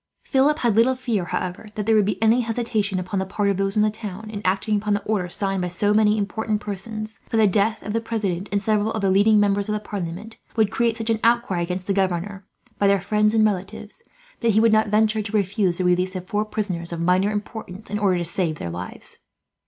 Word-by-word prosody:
Philip 285 +2 +2
had 235 -8 +1
little 240 +4 +4
fear, 235 -8 -2
however, 180 +4 -4
that 210 - -3
there 225 0 +3
would 210 -2 +4
be 200 -3 -1
any 225 +3 +4
hesitation, 225 -4 -1
upon 185 +2 -3
the 190 - -1
part 200 +1 0
of 195 - -2
those 195 +1 +1
in 210 - +5
the 215 - +2
town, 215 -1 -7
in 205 -2 -5
acting 195 +3 +1
upon 205 0 0
the 205 - -3
order 200 -5 -1
signed 195 +1 -1
by 180 - -1
so 205 +4 +1
many 215 0 +4
important 215 +1 -1
persons; 215 +2 -6
for 225 - 0
the 220 - +5
death 210 +2 +1
of 210 - -4
the 230 - 0
president, 205 -5 -3
and 200 - +1
several 215 +1 +1
of 220 - -2
the 195 - +3
leading 210 +2 +5
members 205 0 +1
of - - 0
the 210 - -1
parliament, 205 +1 -6 0.2
would 220 -3 +2
create 235 -1 +1
such 225 0 -1
an 220 - 0
outcry 230 -6 +2
against 180 +1 -3
the 200 - 0
governor, 190 +1 -1 0.4
by 200 - +3
their 200 0 +4
friends 210 +3 +1
and 220 -1 +5
relatives, 205 - -4 0.4
that 230 -2 +2
he 215 - +4
would 225 0 +4
not 215 0 +3
venture 215 +1 +2
to 210 +1 -1
refuse 195 -2 0
the 185 - -1
release 180 +1 +1
of 185 -1 -5
four 205 +3 -1
prisoners, 185 -6 -4
of 170 - -4
minor 180 +4 +2
importance, 210 -1 -6
in 210 - -1
order 195 -3 +2
to 175 - -2
save 170 -1 -1
their 85 - -5
lives. 90 +2 -7
205 Hz, 240 wpm, -23 LUFS, 190-220 Hz, 0.4 s, in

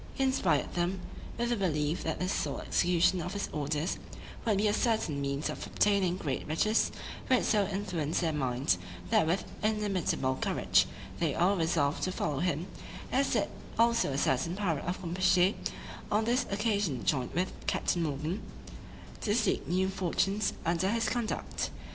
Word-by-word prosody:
He 270 - 0
inspired 265 0 +1
them 175 +2 0 0.4
with 240 +1 0
the 240 - +2
belief 155 -5 0
that 160 - -1
the 180 - 0
sole 145 -6 -1
execution 180 +1 +2
of 180 +3 -4
his 200 - -3
orders 150 +3 -1 0.5
would 215 -3 +2
be 210 +2 +3
a 205 - +2
certain 215 - +1
means 140 +2 -1
of - - -5
obtaining 195 -3 +2
great 140 -8 -3
riches, 215 +8 +2 0.4
which 255 -2 +4
so 205 -3 +2
influenced 180 -7 -1
their 165 -2 +1
minds, 125 -9 +1 0.3
that 160 - +4
with 175 +4 +1 0.2
inimitable 195 -11 0
courage - - +3 0.3
they 160 -4 +1
all 185 +4 +3
resolved 160 -4 +1
to 185 - 0
follow 145 -6 -1
him, 170 -1 0 0.5
as 270 +1 +2
did - - +2 0.3
also 235 -8 +3
a 135 - -1
certain 140 +6 +1
pirate 180 -7 -1
of 180 +2 -2
Campechy, 180 +2 +3 0.6
on 215 +1 +2
this 245 +2 +1
occasion 200 - 0
joined 130 -4 0
with 180 +2 0
Captain 175 - +1
Morgan, 155 +6 -2 0.8
to 210 -1 +1
seek 225 -4 +1
new 185 +2 +2
fortunes 195 +2 0
under 170 +3 +1
his 225 0 +1
conduct. 235 -2 -2
180 Hz, 160 wpm, -31 LUFS, 155-210 Hz, 0.8 s, which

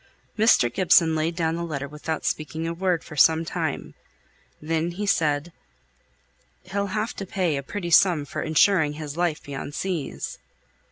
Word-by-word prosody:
Mr. 210 - +4
Gibson 165 0 +4
laid 160 +2 -1
down 165 -1 0
the 170 - -3
letter 145 -4 -4
without 150 +2 -5
speaking 160 +1 -2
a 165 - -2
word 180 -1 0
for 150 - -10
some 160 +2 +4
time; - - -3 0.7
then 160 +2 -1
he 205 +4 -3
said, 160 -4 +1 1.1
"He'll 200 +2 -2
have 215 +4 -2
to 195 - -4
pay 180 -5 0
a 140 - -2
pretty 175 +4 -5
sum 170 -4 +5
for - - -5
insuring 160 0 +3
his 150 -1 -6
life 170 -2 -1
beyond 140 +1 -6
seas." 175 -7 -4
165 Hz, 160 wpm, -24 LUFS, 150-185 Hz, 1.1 s, sum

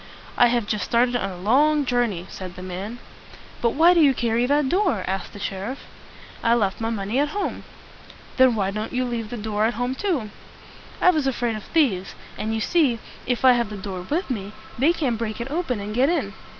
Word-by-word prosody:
"I 245 - +6
have 240 -2 +1
just 210 -2 -1
started 245 +3 +2
on 195 -5 -1
a 185 - -8
long 285 +10 +3
jour 245 -1 +2
ney," 180 -5 -5
said 185 -2 -8
the 185 - -8
man. 190 +6 -5 0.6
"But 235 -1 +1
why 335 +4 +6
do 340 - +4
you 275 -3 +5
carry 235 +1 +1
that 290 0 +2
door?" 360 - +1
asked 190 +1 -3
the - - -11
sheriff. 200 +6 -5 0.6
"I 230 0 +4
left 205 -2 0
my 225 - 0
money 215 +2 -1
at 290 - +2
home." 410 - -3 0.7
"Then 260 -2 +5
why 195 -2 0
didn't 215 +4 -4
you 255 0 0
leave 230 -3 -3
the 240 - -5
door 215 0 -1
at 235 - 0
home 245 +2 -1
too?" 270 - -2 0.7
"I 365 - +6
was 305 -5 0
afraid 240 -3 -1
of 215 - -7
thieves; 220 - +1 0.2
and 220 - -3
you 220 - -2
see, 285 -4 +2 0.3
if 245 +1 0
I 255 - +9
have 235 -3 +1
the 210 - -6
door 190 -2 -5
with 295 - -2
me, 205 -3 -4 0.2
they 280 +7 +3
can't 270 -10 -1
break 220 -1 -3
it 240 +4 -5
open 300 -8 -1
and 205 +1 -5
get 255 +5 +3
in." 280 - -1
235 Hz, 220 wpm, -23 LUFS, 210-270 Hz, 0.7 s, I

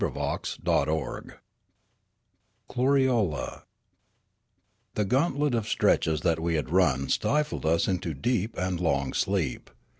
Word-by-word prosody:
CHAPTER - - -2 0.5
XXV 75 0 -1 1.4
KLORIOLE 125 - +1 1.3
THE 105 - +1
gauntlet 140 - +1
of 115 -3 -1
stenches 80 -2 +2
that 80 0 +1
we 85 0 0
had 75 0 -2
run 70 -7 +2
stifled 150 - 0
us 85 +1 +2
into 90 -4 -2
deep 115 - -1
and 90 -1 -1
long 70 -6 0
sleep. 95 -9 -1
90 Hz, 110 wpm, -27 LUFS, 80-120 Hz, 1.4 s, stenches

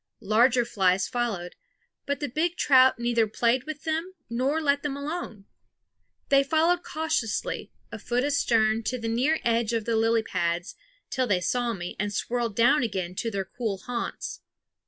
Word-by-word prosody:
Larger 235 +4 +4
flies 190 -4 +2
followed; 220 -8 -2 0.5
but 285 0 -1
the 290 - -2
big 325 +7 -1
trout 260 -2 +5
neither 235 -1 +1
played 235 +3 +1
with 310 -1 -7
them 325 +4 -2 0.2
nor 265 +6 +1
let 285 -2 +1
them 280 -2 -3
alone. 280 - -5 0.8
They 275 0 +5
followed 325 +5 +2
cautiously, 310 -7 -2 0.2
a - - -7
foot 245 +1 -1
astern, 230 -6 +2
to 255 - -1
the 230 -1 -4
near 255 +8 +2
edge 235 -1 +1
of 225 -2 -1
the 230 - 0
lily 225 0 +2
pads, 170 -2 -2 0.4
till 260 -2 0
they 195 -5 +2
saw 240 +6 0
me 175 -3 -6
and 205 +1 -1
swirled 235 0 -2
down 240 +6 +4
again 190 -6 -2
to 230 - -1
their 195 -3 -3
cool 220 0 -3
haunts. 235 +5 -5
240 Hz, 165 wpm, -26 LUFS, 220-280 Hz, 0.8 s, trout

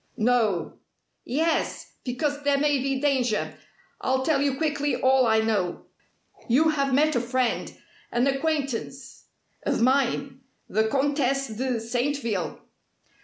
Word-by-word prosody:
"No!" 220 -7 +1 0.5
"Yes. 320 +6 -1
Because 285 +3 -2
there 285 -1 +2
may 290 -1 +2
be 270 0 -1
danger. 260 -6 0 0.5
I'll 260 0 0
tell 295 -4 +2
you 280 -2 +1
quickly 290 -1 0
all 260 -1 +4
I 220 0 +4
know. 205 -6 -1 0.6
You 300 +7 +4
have 275 -3 0
met 300 +3 +3
a 240 - +2
friend 250 0 -1 0.4
an 240 +2 +2
acquaintance 275 -2 -2 0.4
of - - -1
mine, 270 +1 +1 0.3
the 220 +3 +1
Comtesse 275 0 0
de 240 +2 -2
Saintville?" 235 - -2
265 Hz, 120 wpm, -25 LUFS, 240-285 Hz, 0.6 s, all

